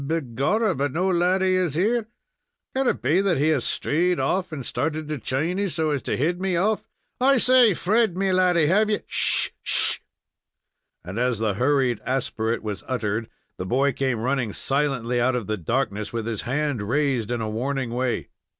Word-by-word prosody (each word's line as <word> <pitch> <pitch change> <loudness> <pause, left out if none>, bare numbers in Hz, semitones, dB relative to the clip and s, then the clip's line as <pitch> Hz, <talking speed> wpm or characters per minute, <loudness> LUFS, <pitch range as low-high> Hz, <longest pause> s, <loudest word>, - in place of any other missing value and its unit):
"Begorrah, 160 - 0
but 140 +1 -1
no 185 +6 0
laddy 185 +2 +2
is 180 -5 0
here. 215 +6 +1 0.7
Can 265 0 +1
it - - 0
be 155 +9 +3
that 195 -5 +1
he 150 +3 +2
has 145 -6 +1
strayed 175 +4 0
off, 180 +8 0
and 140 -5 -6
started 155 +3 -2
to 150 -2 -3
Chiny 165 - -1
so 155 -1 -1
as 140 -3 -1
to - - -2
head 175 +7 0
me 190 -2 0
off? 205 +5 0 0.3
I 270 +2 +4
say! 250 -4 +5
Fred, 215 0 +1
me 195 0 +1
laddy, 180 -3 +3
have 210 +7 +3
ye 210 - 0
" - - -43
"Sh! - - +3
sh!" - - +2 1.1
And 95 +6 -5
as 125 -1 +1
the 110 -1 0
hurried 130 0 +1
aspirate 120 -4 -2
was 105 -2 -5
uttered, 115 -3 -2 0.3
the 90 - -4
boy 135 +6 +2
came 130 -1 -1
running 125 -4 -1
silently 135 -4 -1
out 130 +1 +2
of 120 -4 -2
the 110 - -2
darkness, 105 - -2
with 115 -2 -3
his 115 -2 -3
hand 145 -3 -1
raised 125 0 0
in 120 -1 -1
a 110 - -2
warning 125 +3 -2
way. 125 +1 -2
140 Hz, 185 wpm, -24 LUFS, 120-180 Hz, 1.1 s, say